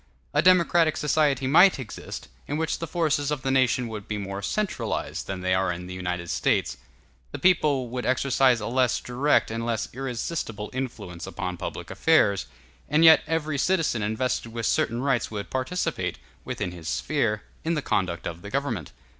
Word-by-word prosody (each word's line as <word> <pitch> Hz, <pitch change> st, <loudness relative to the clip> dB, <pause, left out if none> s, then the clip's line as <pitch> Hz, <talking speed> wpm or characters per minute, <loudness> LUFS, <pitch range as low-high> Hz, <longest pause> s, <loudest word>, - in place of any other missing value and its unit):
A 150 Hz, -, +4 dB
democratic 170 Hz, -2 st, +4 dB
society 145 Hz, -3 st, +2 dB
might 170 Hz, +8 st, +6 dB
exist, 130 Hz, -5 st, -7 dB, 0.2 s
in 145 Hz, -, -2 dB
which 160 Hz, 0 st, -1 dB
the 165 Hz, -, -4 dB
forces 155 Hz, -4 st, 0 dB
of 150 Hz, -3 st, -2 dB
the 135 Hz, -, 0 dB
nation 130 Hz, -2 st, +2 dB
would 105 Hz, -3 st, -7 dB
be 105 Hz, -, -2 dB
more 100 Hz, 0 st, -5 dB
centralized 205 Hz, -, -2 dB
than 95 Hz, -1 st, -4 dB
they 95 Hz, 0 st, +1 dB
are 95 Hz, 0 st, +2 dB
in 90 Hz, +1 st, -5 dB
the 90 Hz, -, -7 dB
United 90 Hz, -2 st, -3 dB
States; -, -, +1 dB, 0.5 s
the -, -, -5 dB
people 150 Hz, -8 st, +3 dB
would 125 Hz, +1 st, -4 dB
exercise 130 Hz, -1 st, +3 dB
a 105 Hz, -, -5 dB
less 125 Hz, +1 st, +1 dB
direct 125 Hz, +1 st, +1 dB
and 115 Hz, +1 st, -3 dB
less 115 Hz, -2 st, -1 dB
irresistible 120 Hz, -4 st, -4 dB
influence 105 Hz, -10 st, -5 dB
upon 90 Hz, 0 st, -4 dB
public -, -, -6 dB
affairs, 105 Hz, -, +3 dB, 0.4 s
and 155 Hz, +3 st, +4 dB
yet 160 Hz, 0 st, +9 dB
every 155 Hz, -3 st, -1 dB
citizen 165 Hz, -9 st, +1 dB
invested 115 Hz, +2 st, -1 dB
with 115 Hz, 0 st, -3 dB
certain 120 Hz, +2 st, +1 dB
rights 135 Hz, -5 st, +1 dB
would 105 Hz, -2 st, -6 dB
participate, 130 Hz, +8 st, -2 dB, 0.3 s
within 90 Hz, -, -3 dB
his 85 Hz, -2 st, -9 dB
sphere, 115 Hz, -8 st, 0 dB, 0.2 s
in 165 Hz, +1 st, 0 dB
the 150 Hz, -, -1 dB
conduct 90 Hz, -5 st, -1 dB
of 85 Hz, +1 st, -5 dB
the 100 Hz, -, -8 dB
government. 120 Hz, -, -2 dB
125 Hz, 175 wpm, -26 LUFS, 105-150 Hz, 0.5 s, yet